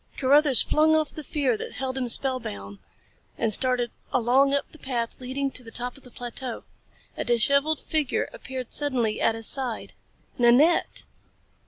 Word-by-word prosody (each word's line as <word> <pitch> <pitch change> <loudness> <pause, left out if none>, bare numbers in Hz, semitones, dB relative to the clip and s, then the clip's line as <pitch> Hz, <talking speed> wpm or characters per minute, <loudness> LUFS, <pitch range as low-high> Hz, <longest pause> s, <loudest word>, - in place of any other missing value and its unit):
Carruthers 280 0 +4
flung 315 +1 +3
off 310 -2 0
the 310 - -7
fear 275 -4 0
that - - -6
held 265 0 -2
him 255 -2 -1
spellbound 100 - 0 0.6
and 220 - +1
started 250 0 +2 0.2
along 255 +3 +3
up 280 0 -1
the 315 - -14
path 240 -2 -4
leading 270 +2 -2
to 255 - -4
the 225 - -10
top 245 +2 -4
of 275 - -13
the 250 - -14
plateau. 245 0 -6 0.5
A - - -3
disheveled 280 +6 +2
figure 305 -4 -1
appeared 260 -2 -7
suddenly 245 -7 0
at 225 - +2
his 225 0 -3
side 255 -3 -2 0.5
Nanette! 250 +8 +4
255 Hz, 160 wpm, -25 LUFS, 240-280 Hz, 0.6 s, Carruthers